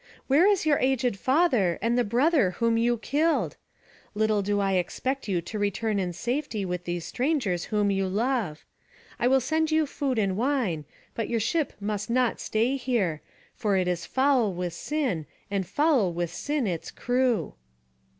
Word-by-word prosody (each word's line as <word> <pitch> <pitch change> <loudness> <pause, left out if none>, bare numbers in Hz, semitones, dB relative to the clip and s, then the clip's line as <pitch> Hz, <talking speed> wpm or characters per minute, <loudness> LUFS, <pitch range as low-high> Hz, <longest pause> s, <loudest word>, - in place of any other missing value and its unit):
Where 295 +8 +5
is 400 -5 +2
your 295 -2 +3
aged 260 -3 +1
father, 250 - +2
and 235 +1 +1
the 245 - +3
brother 250 - +3
whom 230 -1 +2
you 235 +1 +2
killed? 305 +8 0 0.6
Little 215 -1 +2
do 205 +1 0
I 195 -1 +1
expect 255 +9 -2
you 185 -4 0
to 210 +5 -6
return 205 +1 0
in 180 -2 -1
safety 240 - -2
with 180 -1 -4
these 175 -1 -3
strangers 250 - -1
whom 205 -1 +1
you 195 -1 0
love. 210 - -1 0.5
I 240 - +2
will 265 +1 +5
send 315 +5 0
you 315 0 +3
food 275 -3 -2
and 195 -3 +1
wine: 225 - 0 0.3
but 225 - -3
your 235 -1 +1
ship 295 +7 0
must 210 +1 -3
not 250 0 +1
stay 235 +5 0
here, 220 - -1 0.3
for 205 -3 0
it 185 -1 +1
is 175 -1 -2
foul 260 -5 +2
with 175 -1 -3
sin, 250 - -2 0.2
and 195 -3 -1
foul 285 - +2
with 170 0 -3
sin 290 -3 -1
its 175 -5 -3
crew." 250 -2 0
230 Hz, 170 wpm, -26 LUFS, 195-265 Hz, 0.6 s, Where